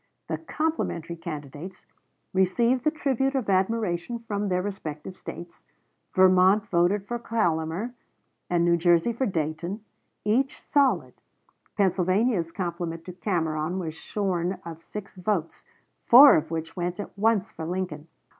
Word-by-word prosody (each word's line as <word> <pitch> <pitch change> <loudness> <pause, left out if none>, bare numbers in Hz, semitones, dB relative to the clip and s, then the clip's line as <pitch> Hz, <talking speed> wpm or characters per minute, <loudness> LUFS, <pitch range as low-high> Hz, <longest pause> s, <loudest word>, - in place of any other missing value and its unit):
The - - -2
"complimentary" 310 - -2
candidates 160 +2 -8 0.5
received 230 +7 +2
the - - +6
tribute 270 -3 0
of 240 -7 0
admiration 190 +1 0
from 210 -3 -3
their 180 0 0
respective 185 -4 -6
States. 175 -1 -9 0.5
Vermont 185 +2 +5
voted 190 +1 +1
for 240 0 -3
Collamer, 180 -1 -1 0.6
and 170 -1 +2
New 170 0 +4
Jersey 175 +6 +3
for 260 +3 -1
Dayton, 170 +3 -3 0.4
each 255 +6 +1
solid. 280 -3 +1 0.6
Pennsylvania's 190 -1 +2
compliment 170 -2 -4
to 180 - -7
Cameron 170 -3 -1
was 165 -4 -3
shorn 185 0 -2
of 165 -1 -8
six 200 +2 -9
votes, 180 -3 -2 0.4
four 275 +4 +10
of 155 - 0
which 165 0 -4
went 175 +1 -3
at 205 - -6
once 215 0 +1
for 160 - -6
Lincoln. 175 -4 -4
185 Hz, 130 wpm, -26 LUFS, 170-215 Hz, 0.6 s, four